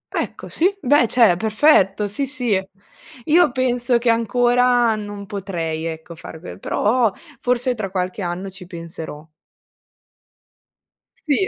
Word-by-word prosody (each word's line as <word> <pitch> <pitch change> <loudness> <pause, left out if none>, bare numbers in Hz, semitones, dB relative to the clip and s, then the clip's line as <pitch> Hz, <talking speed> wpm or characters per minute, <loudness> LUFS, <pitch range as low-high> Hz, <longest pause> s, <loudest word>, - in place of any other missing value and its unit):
Ecco - - -4
sì, 375 +4 +1
beh, 280 -5 +3
cioè, 225 -6 +5
perfetto, 215 -2 +3
sì, 245 +8 -2
sì. 245 -8 0 0.6
Io 330 0 +4
penso 245 -1 +1
che 235 0 0
ancora 245 +1 +3
non 205 -1 -7
potrei 175 -5 -4
ecco 165 +1 -6
fare 160 0 -10
que 90 - -10
però 225 - +1 0.3
forse 250 +1 0
tra 215 -5 -4
qualche 185 +1 -3
anno 180 +2 -4
ci 185 -1 -12
penserò. 165 -3 -8 1.9
Sì. 315 +5 0
215 Hz, 125 wpm, -20 LUFS, 180-250 Hz, 1.9 s, cioè